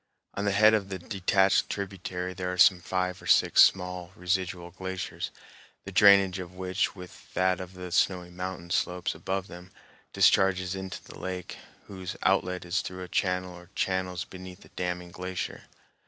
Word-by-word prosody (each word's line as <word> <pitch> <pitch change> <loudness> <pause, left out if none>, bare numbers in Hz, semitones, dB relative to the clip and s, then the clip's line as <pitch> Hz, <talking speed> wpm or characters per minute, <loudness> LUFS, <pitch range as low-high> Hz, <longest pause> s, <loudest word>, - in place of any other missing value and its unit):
On 100 - -3
the 100 - +2
head 110 +2 +6
of 100 -3 +1
the 95 - -3
detached 95 +1 +2
tributary 95 -2 -4
there 90 0 -3
are 90 - -4
some 90 -1 +6
five 90 +1 -2
or - - -10
six - - +6
small 90 -1 +3
residual 90 -1 -2
glaciers, 95 +1 -5 0.5
the 95 - -8
drainage 95 -1 +6
of 90 0 -8
which, 95 +1 -1
with 90 -2 -12
that 90 -1 +2
of 95 0 -8
the 90 -1 -7
snowy 90 0 +1
mountain 90 -1 -6
slopes 90 0 0
above 95 0 -3
them, 90 0 -11 0.4
discharges 95 -1 +3
into 95 -1 -6
the - - -12
lake, 90 -1 -5 0.3
whose 95 -2 -7
outlet 90 -1 +1
is 90 +2 0
through 90 0 -6
a - - -7
channel 90 0 -1
or 90 0 -14
channels 95 -1 -1
beneath 95 0 -10
the - - -16
damming 90 -1 -4
glacier. 90 0 -5
90 Hz, 170 wpm, -28 LUFS, 90-95 Hz, 0.5 s, head